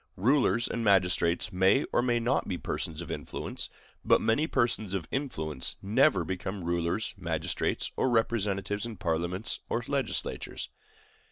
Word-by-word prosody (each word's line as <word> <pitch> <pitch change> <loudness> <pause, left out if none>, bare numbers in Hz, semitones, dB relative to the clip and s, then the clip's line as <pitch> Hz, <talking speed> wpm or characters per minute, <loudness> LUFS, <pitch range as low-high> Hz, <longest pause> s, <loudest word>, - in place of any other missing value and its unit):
Rulers 120 +1 +3
and 115 - -2
magistrates 90 -3 +3
may 95 +9 +4
or - - +4
may 120 -1 +2
not 120 +3 +1
be 90 - -2
persons 80 0 -3
of 85 - -7
influence; - - -4 0.3
but - - +5
many 130 +8 +2
persons 110 - 0
of 85 -5 -3
influence 80 - -2
never 95 -3 +3
become 95 +2 -4
rulers, 85 +5 -1
magistrates, 80 -3 -1
or 130 - +2
representatives 105 -3 0
in 115 -3 -7
parliaments 85 +5 -1
or 120 - 0
legislatures. 140 -4 -2
100 Hz, 140 wpm, -29 LUFS, 85-115 Hz, 0.3 s, but